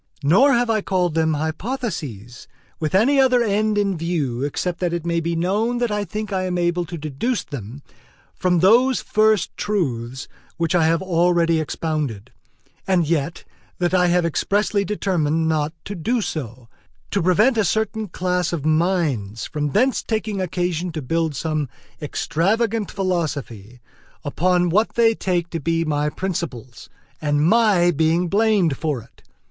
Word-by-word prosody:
Nor 235 - +5
have 240 0 +2
I 220 -2 +1
called 180 -4 0
them 160 -1 +1
hypotheses 155 - -4 0.3
with 155 +2 -1
any 265 +8 +4
other 255 -2 +4
end 210 0 +1
in 200 -2 +1
view 155 -7 -2
except 170 +4 -2
that 175 -2 -1
it 170 -1 -3
may 170 0 0
be 170 +1 -2
known 205 +8 0
that 240 -2 0
I 210 0 -1
think 210 +3 -5
I 185 -1 0
am 180 -1 -2
able 175 0 0
to 170 0 -7
deduce 155 - -2
them 135 +1 -8 0.5
from 180 -2 +1
those 240 +7 +5
first 215 -3 +1
truths 130 - -2 0.3
which 165 0 0
I 170 -3 +3
have 165 +3 +1
already 170 -2 +2
expounded; 150 -8 -3 0.6
and 180 -4 +2
yet 165 0 -1 0.3
that 175 0 0
I 180 -1 +4
have 175 0 +2
expressly 200 +5 0
determined 165 -6 0
not 155 -1 0
to 205 - -5
do 225 +7 -1
so, 130 - -5 0.4
to 200 - +1
prevent 205 +9 +3
a 220 - +2
certain 220 +3 -1
class 180 -1 -1
of 160 -4 -3
minds 155 - 0
from 150 -1 -2
thence 250 - +2
taking 215 -3 -2
occasion 180 -1 -2
to 155 -3 -4
build 165 +2 -1
some 155 -1 -2 0.3
extravagant 205 +8 0
philosophy 140 - -3 0.4
upon 180 +4 +1
what 210 +6 +1
they 235 -1 +5
may - - +1
take 175 -5 -2
to 165 - -3
be 165 +2 0
my 150 -1 0
principles, 150 - -5 0.3
and 145 0 +1
my 205 -5 +4
being 165 +2 +1
blamed 200 - +2
for 145 -7 -2
it. - - -24
175 Hz, 160 wpm, -21 LUFS, 155-205 Hz, 0.6 s, Nor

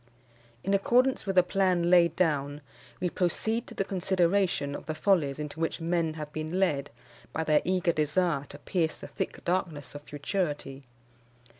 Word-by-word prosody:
In 195 - 0
accordance 245 +5 +3
with 195 - 0
the 180 - +7
plan 180 -2 +1
laid 175 -2 +5
down, 145 -4 0 0.4
we 180 - 0
proceed 220 +6 -1
to - - -10
the - - 0
consideration 185 -5 +1
of - - -7
the 155 - -2
follies 155 -6 +2
into 150 +1 -6
which 165 - -1
men 165 -1 0
have 150 -2 -7
been 155 +4 -3
led 145 -7 +1 0.4
by 160 - -1
their 155 -1 +3
eager 180 -1 +1
desire 155 -1 +1
to 145 - -11
pierce 160 +1 -1
the - - -9
thick - - -5
darkness 165 -7 -2
of 145 - -8
futurity. 145 -3 -3
170 Hz, 165 wpm, -29 LUFS, 150-185 Hz, 0.4 s, the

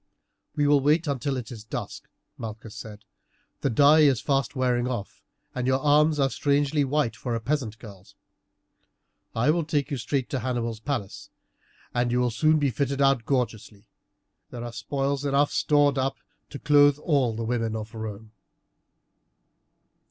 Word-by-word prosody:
"We 145 - +1
will 145 0 +5
wait 150 +4 +2
until 140 -1 -2
it 125 +1 -6
is 110 -3 -9
dusk," 110 - -7 0.3
Malchus 110 -1 -8
said; 105 0 -10 0.5
"the 140 - 0
dye 145 +6 +5
is 140 -6 +5
fast 135 -1 -1
wearing 125 -2 +1
off, 120 -6 -5 0.3
and 125 0 -2
your 130 0 +2
arms 150 +2 +3
are 135 -1 +2
strangely 145 +1 +1
white 135 -5 0
for 115 +3 -3
a - - -1
peasant 115 -2 -2
girl's. 100 -5 -14 1.2
I 120 +6 +3
will 170 +1 0
take 150 -2 -1
you 140 - -1
straight 130 +1 -2
to 135 - -1
Hannibal's 120 -2 -3
palace, 115 -5 -5 0.6
and 120 0 0
you 125 - +1
will 125 -1 +1
soon 155 +7 +3
be 145 -3 +1
fitted 140 +3 -2
out 135 -4 +3
gorgeously. 115 -6 -2 0.6
There 120 -1 -7
are 120 -1 -6
spoils 135 +5 -2
enough 145 +1 +2
stored 145 -2 +2
up 135 +1 -1 0.3
to 140 - -7
clothe 145 -1 +4
all 140 -7 +1
the 115 0 -3
women 115 -1 -1
of 110 +1 -6
Rome." 110 -1 -7
130 Hz, 160 wpm, -26 LUFS, 115-145 Hz, 1.2 s, will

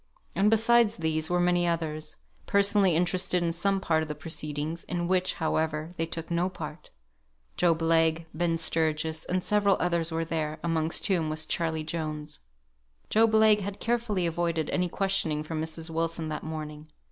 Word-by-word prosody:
And 195 +4 +3
besides 225 0 +4
these 160 -1 -1
were 175 0 +1
many 175 0 +2
others, 155 -2 -3 0.3
personally 200 -3 +3
interested 180 +1 +1
in 165 -1 0
some 195 +3 +1
part 160 -4 +1
of 160 - -3
the 150 - -5
proceedings, 155 +1 -5
in 175 -1 -2
which, 185 0 +1
however, 160 0 -1
they 165 -1 -2
took 165 0 -6
no 170 +2 +1
part; 155 -3 -8 0.7
Job 165 -2 +2
Legh, 165 0 +3
Ben 165 +1 0
Sturgis, 160 -1 0
and 185 0 -1
several 205 -2 +3
others 170 -1 0
were 165 0 -1
there, 155 -1 -2
amongst 165 -1 0
whom 175 -6 +1
was 155 +1 -1
Charley 160 -2 -1
Jones. 155 -2 -5 0.7
Job 225 0 +4
Legh 220 -1 +6
had 200 0 -5
carefully 230 -6 0
avoided 170 -1 -1
any 180 -1 0
questioning 190 -6 0
from 155 0 -4
Mrs. 160 +1 -4
Wilson 165 0 -2
that 155 - -4
morning. 155 -1 -7
165 Hz, 165 wpm, -28 LUFS, 160-180 Hz, 0.7 s, Legh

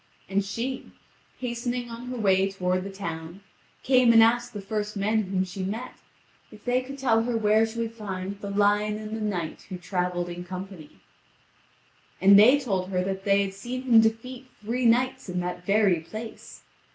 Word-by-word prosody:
And 195 +1 0
she, 235 +7 -4 0.5
hastening 240 0 -3
on 235 +2 -8
her 250 0 -5
way 195 -3 +3
toward 185 -1 -1
the 200 - -6
town, 170 -2 -7 0.4
came 255 -2 +5
and 225 -1 +8
asked 240 +1 +2
the 210 - -6
first 210 +1 -4
men 215 +2 +1
whom 185 0 0
she 185 +1 -7
met, 220 +7 -4 0.6
if 215 -1 -15
they 250 +1 +2
could 275 +2 -9
tell 230 -5 +2
her 235 0 -1
where 220 +1 +3
she 225 +1 -9
would 230 0 -3
find 200 -3 -6
the 200 - -5
lion 205 +1 +2
and 215 0 -6
the 220 - -5
knight 180 -7 -4
who 185 - -5
travelled 180 -1 -2
in 175 0 -6
company. 185 - -9 1.2
And 200 +1 +7
they 250 +7 +7
told 190 -8 -2
her 180 -1 0
that 195 0 -4
they 200 0 +4
had 195 -1 -4
seen 245 +6 -6
him 235 -4 +6
defeat 240 +4 -2
three 235 +4 0
knights 255 0 +1
in 180 0 -2
that 180 0 -5
very 200 -4 +3
place. 215 +7 -9
210 Hz, 185 wpm, -26 LUFS, 190-235 Hz, 1.2 s, and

